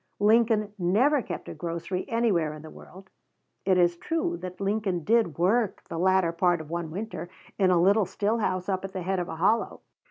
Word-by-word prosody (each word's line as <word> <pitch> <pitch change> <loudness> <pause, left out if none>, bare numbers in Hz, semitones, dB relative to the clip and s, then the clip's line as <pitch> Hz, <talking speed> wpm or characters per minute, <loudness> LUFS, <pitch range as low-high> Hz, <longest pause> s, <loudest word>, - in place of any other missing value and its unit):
Lincoln 215 -1 +3
never 240 +12 +3
kept - - -7
a - - -6
grocery 170 +2 -4
anywhere 200 -10 +1
in 155 - -11
the 155 - -10
world. 190 +1 -14 0.5
It 190 -1 +3
is 175 -1 +3
true 330 - -2
that 180 0 -8
Lincoln 195 -3 -1
did 220 -6 +2
work 205 +5 +1
the 165 - -4
latter 185 -1 +3
part 175 0 +1
of 160 0 -9
one 170 -1 -3
winter 195 +1 -6 0.3
in 190 -2 +4
a 180 -1 +4
little 200 +3 +4
still 215 +3 -1
house 185 -4 -1
up 190 -1 -1
at 195 -1 -6
the 185 - -4
head 190 +1 -1
of 175 - -3
a 160 - -5
hollow. 205 +8 +1
190 Hz, 200 wpm, -27 LUFS, 175-215 Hz, 0.5 s, in